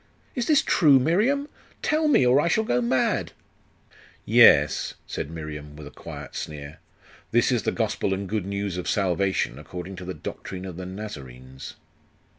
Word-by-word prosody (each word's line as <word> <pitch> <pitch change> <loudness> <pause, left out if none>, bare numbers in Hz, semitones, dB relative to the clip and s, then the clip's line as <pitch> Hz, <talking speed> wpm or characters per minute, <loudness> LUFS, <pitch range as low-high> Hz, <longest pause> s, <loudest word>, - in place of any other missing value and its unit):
Is 245 -2 -2
this 300 -3 +4
true, 145 -6 +5
Miriam? 215 - +2 0.4
Tell 310 0 +2
me, 280 - +4
or 125 +4 +5
I 170 - 0
shall 215 +6 +2
go 125 - +1
mad!' 125 +2 0 0.9
'Yes,' - - +5
said - - -5
Miriam, 75 -2 -7
with 75 -1 -10
a 70 - -10
quiet - - -9
sneer. 75 0 -7 0.5
'This - - +3
is - - +2
the - - 0
gospel - - -1
and 95 +1 -2
good 105 -2 -2
news 100 -2 -3
of 90 - -3
salvation, 95 - 0
according 90 +6 -7
to 90 - -7
the 95 - -5
doctrine 95 0 -7
of 90 -3 -7
the 90 +1 -6
Nazarenes. 65 -10 -9
95 Hz, 165 wpm, -25 LUFS, 80-130 Hz, 0.9 s, true